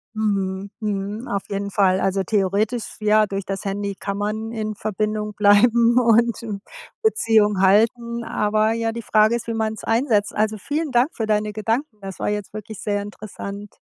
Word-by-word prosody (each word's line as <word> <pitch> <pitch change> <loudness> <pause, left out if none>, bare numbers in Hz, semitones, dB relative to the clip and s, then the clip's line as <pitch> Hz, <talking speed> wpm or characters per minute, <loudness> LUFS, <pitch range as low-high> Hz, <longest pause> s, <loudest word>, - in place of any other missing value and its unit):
Mhm, 200 -2 -1
mhm. 210 +2 -3
Auf 200 -1 -2
jeden 200 0 -3
Fall, 190 -2 +3
also 195 0 +1
theoretisch, 210 +4 0
ja, 215 0 +4
durch 195 -1 -4
das 195 -1 -4
Handy 200 0 -3
kann 200 +1 -4
man 215 +2 -3
in 215 -2 -3
Verbindung 210 +1 -2
bleiben 230 +4 +4
und 235 0 +3 0.6
Beziehung 220 - +3
halten, 235 +4 +2
aber 215 +1 +1
ja, 230 0 -1
die 235 +1 -5
Frage 215 +1 +3
ist, 235 - -5
wie 230 - -2
man's 220 -1 -2
einsetzt. 225 -3 +1
Also 215 0 +1
vielen 295 - -3
Dank 245 +3 +3
für 225 - -2
deine 210 0 0
Gedanken. 225 +4 -2
Das 195 -1 -8
war - - -2
jetzt 210 -1 -4
wirklich 215 -1 -8
sehr 205 -1 -1
interessant. 205 0 -8
215 Hz, 170 wpm, -22 LUFS, 200-225 Hz, 0.6 s, ja